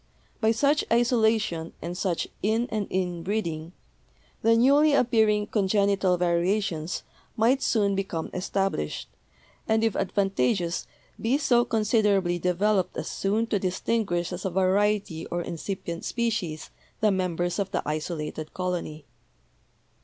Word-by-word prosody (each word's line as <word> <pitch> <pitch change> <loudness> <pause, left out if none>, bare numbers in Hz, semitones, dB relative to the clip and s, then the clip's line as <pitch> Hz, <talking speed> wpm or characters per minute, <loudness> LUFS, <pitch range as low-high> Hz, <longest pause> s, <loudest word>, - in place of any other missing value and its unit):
By 220 - +2
such 280 +6 +2
isolation 220 -8 +2
and 175 - -5
such 180 -2 -1
in 225 +4 +1
and 215 -2 -1
in 180 -2 -1
breeding 170 -4 -3 0.7
the 230 0 +4
newly 285 +5 +5
appearing 220 -5 +3
congenital 200 -2 +2
variations 175 -1 0 0.3
might 245 +5 +3
soon 205 -3 +2
become 190 -4 -3
established, 195 - -2 0.6
and 220 0 +2
if 225 -2 +1
advantageous 190 -3 0 0.3
be 240 +5 +2
so 250 -5 +3
considerably 210 -6 +2
developed 185 +2 +1
as - - -4
soon 210 +4 0
to 205 - +3
distinguish 185 -1 -1
as 180 - -5
a 190 - 0
variety 190 -2 +1
or 175 0 -2
incipient 170 0 -5
species 220 -10 -2 0.3
the 215 -1 +3
members 175 -1 -1
of 195 -1 -1
the - - -2
isolated 155 0 -4
colony. 175 -5 -3
195 Hz, 125 wpm, -26 LUFS, 175-220 Hz, 0.7 s, newly